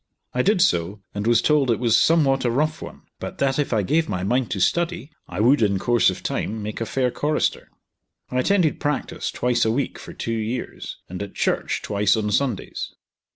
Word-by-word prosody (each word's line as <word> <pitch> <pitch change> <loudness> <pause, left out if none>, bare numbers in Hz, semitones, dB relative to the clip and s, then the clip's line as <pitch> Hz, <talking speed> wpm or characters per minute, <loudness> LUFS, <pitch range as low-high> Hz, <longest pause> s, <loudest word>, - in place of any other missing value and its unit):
I 125 - +1
did 195 +1 +3
so, 95 - 0
and 105 +2 -3
was 120 0 +4
told 150 -4 +3
it 115 - +3
was 115 -2 +2
somewhat 140 -4 +3
a 120 - +2
rough 155 +6 0
one, - - -9 0.2
but - - -6
that 135 0 +1
if 145 - 0
I 110 -3 +2
gave 160 - +1
my 90 -2 -2
mind 120 +4 +1
to 100 - -2
study, 170 - 0 0.2
I - - -6
would, 125 +6 +4
in 100 -3 +2
course 120 +4 +3
of - - -5
time, 110 0 -2
make 105 +2 -5
a 115 - -2
fair 125 0 0
chorister. 150 - -1 0.6
I 125 - 0
attended 180 +1 +2
practice 150 -1 -2
twice 120 -1 +1
a 110 - +2
week 130 +5 -1
for - - -10
two 115 - -3
years, 115 +2 -4
and 90 +1 -6
at 100 -1 -7
church - - -1
twice 100 0 +2
on 105 -1 -1
Sundays. 125 -3 -2
120 Hz, 205 wpm, -23 LUFS, 105-145 Hz, 0.6 s, was